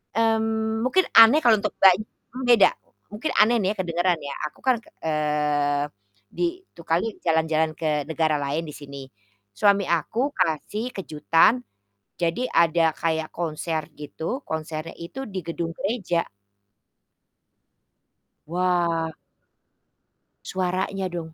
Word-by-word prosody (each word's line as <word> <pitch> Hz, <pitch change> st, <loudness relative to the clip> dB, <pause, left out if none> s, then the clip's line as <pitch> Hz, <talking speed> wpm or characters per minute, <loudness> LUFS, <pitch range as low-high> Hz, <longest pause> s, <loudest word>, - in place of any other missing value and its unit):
Mmm, 220 Hz, 0 st, +1 dB
mungkin 375 Hz, +9 st, +3 dB
aneh 230 Hz, +7 st, +8 dB
kalo 225 Hz, -3 st, +5 dB
untuk -, -, -2 dB
Mbaknya, 195 Hz, +3 st, +5 dB, 0.4 s
beda 235 Hz, -4 st, +7 dB, 0.4 s
mungkin 215 Hz, +9 st, -3 dB
aneh 225 Hz, +3 st, +5 dB
nih 190 Hz, -, +1 dB
kedengeran 175 Hz, 0 st, +1 dB
ya 140 Hz, -1 st, -6 dB
aku 150 Hz, -, -16 dB
kan 255 Hz, -1 st, +3 dB
ke -, -, -19 dB
eee, 150 Hz, -2 st, 0 dB, 0.5 s
di 355 Hz, +2 st, -2 dB
itu -, -, -15 dB
kali 170 Hz, +6 st, +1 dB, 0.2 s
jalan-jalan 160 Hz, -1 st, +1 dB
ke 150 Hz, -3 st, -1 dB
negara 160 Hz, -1 st, +1 dB
lain 145 Hz, +3 st, -2 dB
di 150 Hz, -, -8 dB
sini. 140 Hz, -1 st, -9 dB, 0.5 s
Suami 200 Hz, -, +3 dB
aku 170 Hz, +7 st, -1 dB, 0.2 s
kasih 190 Hz, +7 st, -1 dB
kejutan, 165 Hz, -, +2 dB, 0.6 s
jadi 170 Hz, +9 st, 0 dB
ada 165 Hz, -1 st, +3 dB
kayak 160 Hz, -1 st, -1 dB
konser 160 Hz, -1 st, -3 dB
gitu, 160 Hz, -, -5 dB
konsernya 160 Hz, 0 st, -5 dB
itu 250 Hz, +11 st, -7 dB
di 190 Hz, -2 st, -4 dB
gedung 165 Hz, 0 st, -4 dB
gereja. 195 Hz, -5 st, -1 dB, 2.2 s
Wah. 170 Hz, -1 st, 0 dB, 1.3 s
Suaranya 185 Hz, +1 st, -2 dB
dong, 165 Hz, -2 st, -6 dB
170 Hz, 120 wpm, -24 LUFS, 160-210 Hz, 2.2 s, aneh